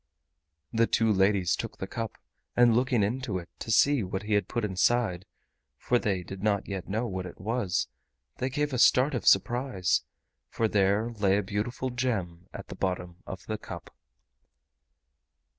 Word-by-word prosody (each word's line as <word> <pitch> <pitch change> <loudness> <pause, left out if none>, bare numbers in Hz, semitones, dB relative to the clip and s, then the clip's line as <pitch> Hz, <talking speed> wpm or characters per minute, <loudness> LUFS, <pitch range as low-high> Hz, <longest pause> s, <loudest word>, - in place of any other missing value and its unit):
The 115 0 +3
two 110 -1 +2
ladies 95 -2 +3
took - - -6
the - - -4
cup, 115 +2 -5 0.4
and 120 -1 +6
looking 125 -3 +2
into 115 -1 -1
it 85 -1 -8
to - - -6
see 135 +5 +4
what 95 0 -3
he 105 +1 -2
had 105 -3 +2
put 120 -2 -1
inside—for 105 +3 -1
they 95 -5 -1
did 95 +1 -8
not 105 -2 +1
yet 95 -3 -5
know 110 +4 -1
what 95 -4 -4
it 90 - -11
was—they 90 - -3
gave 145 +2 -1
a 125 - 0
start 130 +4 +5
of 120 -6 -3
surprise, 120 -2 +3 0.5
for 115 - 0
there 105 +3 +2
lay 100 -3 +2
a 105 - 0
beautiful 110 +6 -3
gem 100 -9 -2
at - - -9
the - - -6
bottom 90 -2 -3
of 95 - -7
the 110 -1 -3
cup. 85 -5 -9
105 Hz, 160 wpm, -28 LUFS, 95-120 Hz, 0.5 s, and